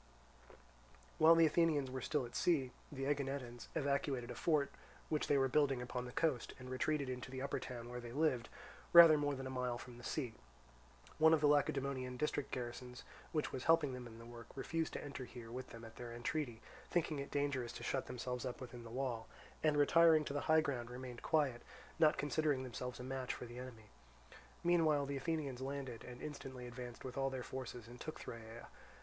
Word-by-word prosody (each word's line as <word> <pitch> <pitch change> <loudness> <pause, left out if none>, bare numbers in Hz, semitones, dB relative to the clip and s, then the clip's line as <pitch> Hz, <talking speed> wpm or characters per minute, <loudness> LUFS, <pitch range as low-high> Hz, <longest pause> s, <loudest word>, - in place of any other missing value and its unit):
While 160 +1 +8
the 165 0 +7
Athenians 155 -4 +3
were 130 0 -3
still 145 0 0
at 120 - -10
sea, 140 -8 +2 0.2
the 135 -2 -3
Aeginetans 135 -4 -2
evacuated 140 -4 0
a - - -3
fort 150 -4 +2 0.4
which 155 -1 0
they 145 - +4
were 135 -1 +4
building 135 -1 +3
upon 125 0 -3
the 125 - -7
coast, 145 -4 0
and 130 0 -8
retreated 140 +2 0
into 125 0 -4
the 130 +1 -4
upper 140 - -1
town 120 -2 -6
where 125 0 -5
they 120 -1 -7
lived, 130 -4 +1 0.4
rather 170 -2 +11
more 145 -1 +1
than 135 0 -5
a 130 - -4
mile 125 -2 -1
from 120 0 -10
the - - -12
sea. 125 -3 -2 0.9
One 160 +1 +8
of - - 0
the - - +4
Lacedaemonian 140 -3 +1
district 145 +1 -1
garrisons 125 0 -5 0.3
which 155 -3 0
was 130 - -4
helping 165 -5 +4
them 125 -1 -6
in 115 -1 -11
the 115 - -11
work, 120 -1 -10
refused 160 +4 -2
to - - -4
enter 140 -2 -5
here 120 -2 -9
with 130 +1 -6
them 115 0 -9
at 115 0 -12
their 120 -1 -6
entreaty, 120 0 -3 0.3
thinking 160 -4 +1
it 140 - -4
dangerous 140 -4 0
to - - -7
shut 135 - -1
themselves 125 0 -3
up 125 -2 -4
within 120 -2 -8
the 115 - -9
wall, 120 -2 -2 0.3
and 155 -1 +3
retiring 160 +1 +6
to 140 - -3
the 145 - 0
high 160 0 +7
ground 125 -6 -2
remained 125 -1 -7
quiet, 140 -6 +2 0.4
not 155 -2 +5
considering 145 -2 +1
themselves 125 0 -5
a - - -5
match 130 0 -3
for - - -7
the 120 +1 -8
enemy. 115 -5 -9 0.7
Meanwhile 160 -4 +4
the 140 0 -2
Athenians 140 -3 -2
landed, 135 -3 -4
and 125 -1 -9
instantly 135 -4 -6
advanced 120 0 -7
with 130 +1 -4
all 135 0 +2
their 130 -2 -4
forces 125 -3 -6
and 120 +1 -11
took 155 - -5
Thyrea. 115 0 -8
130 Hz, 205 wpm, -38 LUFS, 125-145 Hz, 0.9 s, rather